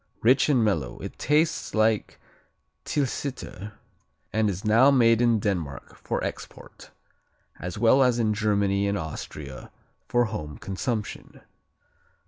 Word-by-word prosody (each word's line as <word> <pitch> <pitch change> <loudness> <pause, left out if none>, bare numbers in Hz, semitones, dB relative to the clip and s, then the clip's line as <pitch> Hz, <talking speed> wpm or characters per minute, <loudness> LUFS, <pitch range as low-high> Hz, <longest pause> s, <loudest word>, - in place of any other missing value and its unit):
Rich 130 +6 +4
and 125 -6 +3
mellow, 75 - -1
it - - -8
tastes 155 -2 +1
like 110 -1 +1 0.7
Tilsiter 130 -7 -3 0.6
and 110 -1 +2
is 95 +2 -5
now 115 +6 +6
made 115 -4 +4
in 120 -2 +4
Denmark 85 -10 -3
for - - -3
export, - - -8 0.7
as 90 +2 -5
well 120 +5 +4
as 125 -2 +3
in 110 -2 +1
Germany 100 -2 +1
and 100 0 0
Austria 75 -4 -7 0.4
for 120 0 +2
home 75 - -6
consumption. 105 +3 -5
110 Hz, 120 wpm, -26 LUFS, 100-120 Hz, 0.7 s, now